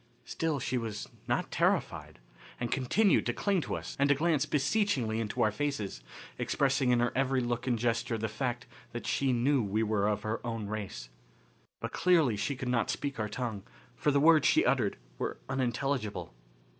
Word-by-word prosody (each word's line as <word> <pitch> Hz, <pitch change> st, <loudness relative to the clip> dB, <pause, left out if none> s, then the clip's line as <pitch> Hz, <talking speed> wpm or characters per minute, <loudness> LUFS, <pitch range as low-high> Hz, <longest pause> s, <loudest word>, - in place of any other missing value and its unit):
Still 160 Hz, -3 st, -1 dB
she 125 Hz, 0 st, -1 dB
was 110 Hz, -3 st, -5 dB, 0.2 s
not -, -, 0 dB
terrified, -, -, 0 dB, 0.4 s
and 120 Hz, -1 st, -2 dB
continued 180 Hz, -, +3 dB
to -, -, +1 dB
cling 200 Hz, -3 st, +1 dB
to -, -, -3 dB
us -, -, -6 dB
and 140 Hz, 0 st, +3 dB
to 140 Hz, -, +5 dB
glance 155 Hz, -1 st, +1 dB
beseechingly 145 Hz, -, +1 dB
into 110 Hz, -2 st, -1 dB
our 110 Hz, -, +3 dB
faces, 105 Hz, -, -3 dB, 0.4 s
expressing 135 Hz, -1 st, +1 dB
in 120 Hz, -1 st, +4 dB
her 120 Hz, +1 st, +2 dB
every 135 Hz, 0 st, +2 dB
look 120 Hz, 0 st, -2 dB
and 120 Hz, -2 st, +2 dB
gesture 115 Hz, 0 st, 0 dB
the 110 Hz, 0 st, -2 dB
fact 120 Hz, +2 st, -3 dB, 0.3 s
that 120 Hz, -, -5 dB
she 135 Hz, -1 st, +1 dB
knew 130 Hz, +3 st, +2 dB
we 105 Hz, +1 st, 0 dB
were 105 Hz, -2 st, +1 dB
of 105 Hz, -1 st, -1 dB
her 110 Hz, +1 st, -3 dB
own 115 Hz, -3 st, -3 dB
race. 100 Hz, -, -5 dB, 0.7 s
But -, -, -4 dB
clearly 165 Hz, -11 st, +3 dB
she 105 Hz, +8 st, -2 dB
could 125 Hz, 0 st, -5 dB
not 125 Hz, -3 st, +1 dB
speak 140 Hz, -4 st, -3 dB
our 105 Hz, -1 st, -1 dB
tongue, 110 Hz, -2 st, -3 dB, 0.3 s
for 150 Hz, -, +1 dB
the 140 Hz, -1 st, +3 dB
words 155 Hz, +1 st, +6 dB
she -, -, +4 dB
uttered 120 Hz, -5 st, +1 dB, 0.2 s
were -, -, -2 dB
unintelligible. 130 Hz, -, -2 dB
125 Hz, 180 wpm, -31 LUFS, 110-140 Hz, 0.7 s, words